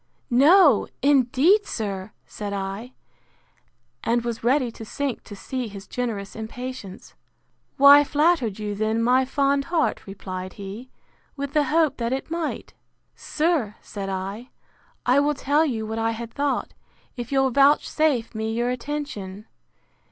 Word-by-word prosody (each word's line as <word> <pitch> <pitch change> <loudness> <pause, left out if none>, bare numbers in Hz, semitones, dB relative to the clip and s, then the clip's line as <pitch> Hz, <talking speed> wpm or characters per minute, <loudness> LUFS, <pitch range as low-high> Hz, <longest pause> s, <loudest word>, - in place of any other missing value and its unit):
—No, 290 - +6 0.2
indeed, 285 - +4
sir! 200 -2 -4
said 205 -1 -6
I—And 230 +3 -6
was 235 -2 -4
ready 250 0 +2
to 225 - -10
sink 270 +3 -3
to 205 - -9
see 255 +4 -4
his 200 -2 -9
generous 215 -4 -4
impatience. 225 -2 -7 0.6
Why 280 +1 +9
flattered 290 - +1
you 210 -1 -3
then 220 +2 0
my 255 +2 +4
fond 275 +1 +1
heart, 335 -9 -1
replied 185 -1 -6
he, 205 +5 -8 0.5
with 280 0 -5
the 300 -1 +3
hope 315 +1 +2
that 235 +1 -1
it 270 +4 -4
might?—Sir, 315 -5 -3
said 195 -2 -6
I, 195 +6 -5 0.6
I 255 +3 +4
will 295 +1 +1
tell 290 +4 +2
you 225 -5 -2
what 220 +1 -4
I 225 0 0
had 230 0 -7
thought, 285 -1 -1 0.4
if 240 -1 -6
you'll 270 -1 +2
vouchsafe 280 -2 +3
me 220 0 -3
your 240 +2 0
attention. 240 -7 -5
245 Hz, 135 wpm, -24 LUFS, 215-285 Hz, 0.6 s, Why